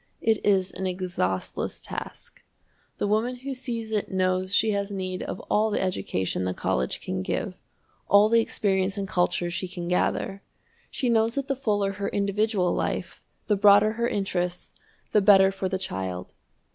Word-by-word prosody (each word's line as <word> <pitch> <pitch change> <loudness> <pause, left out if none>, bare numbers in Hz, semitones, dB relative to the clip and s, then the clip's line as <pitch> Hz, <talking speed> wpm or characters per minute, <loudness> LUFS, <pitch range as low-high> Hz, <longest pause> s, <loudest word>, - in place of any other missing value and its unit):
It 225 -1 +2
is 190 -2 +2
an 190 +1 -3
exhaustless 180 - -2
task. - - -8 0.6
The - - -1
woman 220 +5 +1
who 265 +2 -5
sees 235 -4 -4
it 210 -2 -1
knows 185 0 0
she 220 +2 +3
has 200 -1 -1
need 185 -2 -4
of - - -5
all 215 +1 +1
the 210 - 0
education 95 - -1
the 90 0 -2
college 65 0 -1
can 95 0 -3
give, 95 - -2 0.5
all 200 +2 +6
the 230 +1 +4
experience 195 -3 0
and 195 -1 -2
culture 175 -1 0
she 180 +2 -3
can 175 -1 -6
gather. 195 +2 0 0.5
She 255 - -2
knows 230 -1 +3
that 275 -1 -2
the 275 - 0
fuller 205 -6 0
her 200 0 -3
individual 200 -2 +1
life, - - -3 0.2
the 210 - +2
broader 205 +1 +6
her 235 +1 -1
interests, 180 -4 -2 0.4
the 210 - +4
better 195 -1 +6
for 195 -1 -3
the 190 - -1
child. 95 - -5
195 Hz, 170 wpm, -26 LUFS, 185-215 Hz, 0.6 s, all